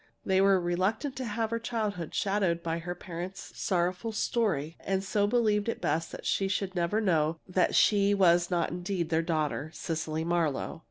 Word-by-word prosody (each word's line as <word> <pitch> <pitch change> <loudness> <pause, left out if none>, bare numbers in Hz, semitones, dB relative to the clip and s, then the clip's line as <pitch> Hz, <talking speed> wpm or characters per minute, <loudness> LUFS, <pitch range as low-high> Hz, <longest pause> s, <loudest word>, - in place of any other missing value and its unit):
They 190 0 +3
were 195 -1 +5
reluctant 185 - -1
to 260 - -3
have 225 0 -2
her 230 - 0
childhood 215 -8 -3
shadowed 195 -4 +1
by 165 0 -1
her 175 +1 -5
parents' 180 +2 -7
sorrowful 180 +4 -1
story, 190 - 0
and 190 0 -1
so 205 +1 +1
believed 215 -2 +2
it - - -3
best 165 0 -1
that - - -9
she 195 - +1
should 190 0 -2
never 175 +4 0
know 165 -6 +1
that 185 -1 +1
she 205 -1 +4
was 175 -2 +4
not 175 -2 0
indeed 175 -1 -2
their 160 -1 +2
daughter, 155 -2 -1
Cecily 160 -1 -3
Marlowe. 165 -3 -1
185 Hz, 175 wpm, -29 LUFS, 170-205 Hz, -, were